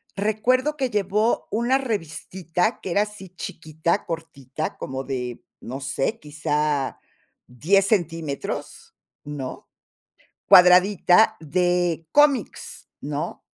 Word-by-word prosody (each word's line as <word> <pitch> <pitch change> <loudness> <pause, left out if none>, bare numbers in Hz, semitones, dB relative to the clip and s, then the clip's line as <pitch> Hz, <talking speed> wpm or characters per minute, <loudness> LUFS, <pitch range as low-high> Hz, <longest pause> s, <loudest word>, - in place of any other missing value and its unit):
recuerdo 245 +8 +1
que 265 -4 -1
llevó 210 +2 0
una 240 +4 +2
revistita 190 - -2
que 185 - -5
era 200 +4 +3
así 210 -3 -10
chiquita, 160 -2 -3
cortita, 155 -3 -5
como 130 0 -5
de, 125 -3 -4 0.2
no 130 +3 -6
sé, 140 +10 -2
quizá 150 -2 -1 0.5
10 185 +11 +2
centímetros, 165 -8 -3 0.3
¿no?, 145 -3 -7 0.8
cuadradita 180 +3 +6
de 175 0 0
cómics, 290 -3 +1
¿no? - - -4
175 Hz, 95 wpm, -23 LUFS, 150-210 Hz, 0.8 s, cuadradita